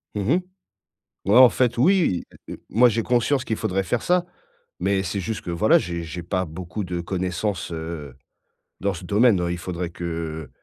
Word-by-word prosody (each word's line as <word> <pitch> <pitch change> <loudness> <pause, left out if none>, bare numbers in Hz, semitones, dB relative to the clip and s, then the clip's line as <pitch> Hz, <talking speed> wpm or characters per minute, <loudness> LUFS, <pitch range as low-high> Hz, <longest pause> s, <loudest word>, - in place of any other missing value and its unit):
Mmh 105 - -1
mh. - - +2 0.9
Ouais, 100 +4 +4
en 130 -1 +10
fait. 120 -1 0
Oui, 160 - +3 0.2
heu - - -5
heu, - - -13
moi 125 +3 +5
j'ai 115 0 0
conscience 125 +3 +1
qu'il 110 - -2
faudrait 95 +1 -1
faire 115 +5 -1
ça, 180 0 +2 0.5
mais 95 -1 +1
c'est 95 +2 -3
juste 110 +4 -3
que, - - -5
voilà, 85 -1 +4
j'ai 85 0 -4
j'ai 85 +2 -6
pas 90 +2 -1
beaucoup 90 +5 -6
de 90 -1 -3
connaissances, 90 +1 -2
heu, 80 -4 -6 0.7
dans 100 0 0
ce 85 - -8
domaine, 105 +1 +4
heu, 85 0 -1
il 85 - -2
faudrait 90 0 -4
que 80 -3 -5
95 Hz, 190 wpm, -23 LUFS, 85-110 Hz, 0.9 s, en